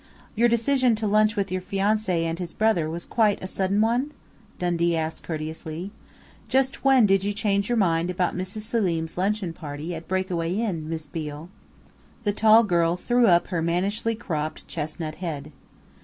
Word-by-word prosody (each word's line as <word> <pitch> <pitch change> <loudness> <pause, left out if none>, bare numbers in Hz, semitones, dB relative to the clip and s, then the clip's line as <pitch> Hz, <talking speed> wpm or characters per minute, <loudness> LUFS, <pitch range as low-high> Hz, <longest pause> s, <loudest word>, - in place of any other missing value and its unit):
"Your 235 +1 +3
decision 240 +1 +3
to 215 0 -3
lunch 215 +1 +3
with 195 -2 -1
your 185 0 -1
fiancé 195 -2 0
and 165 +1 -2
his 175 -2 -6
brother 215 -8 +2
was 170 +2 -5
quite 215 -5 +1
a - - -3
sudden 195 +1 0
one?" 240 +6 +1 0.5
Dundee 170 -1 +1
asked 160 0 -3
courteously. 160 +3 -5 0.6
"Just 265 +1 +1
when 265 -4 +6
did 195 -1 +3
you 205 +1 -1
change 200 0 0
your 240 - +1
mind 170 -4 +2
about 180 0 0
Mrs. 185 +4 -4
Selim's 180 -8 -1
luncheon 195 -1 -1
party 155 +1 -6
at 165 0 -7
Breakaway 185 -2 -1
Inn, 185 -8 -2
Miss 160 -1 -4
Beale?" 150 +1 -6 0.7
The 205 -2 +1
tall 220 +2 +6
girl 170 -4 +2
threw 240 +4 +3
up 175 -2 +4
her 175 -3 -1
mannishly 195 +7 0
cropped, 155 -9 -4
chestnut 155 0 -5
head. 155 -4 -4
185 Hz, 170 wpm, -25 LUFS, 165-215 Hz, 0.7 s, when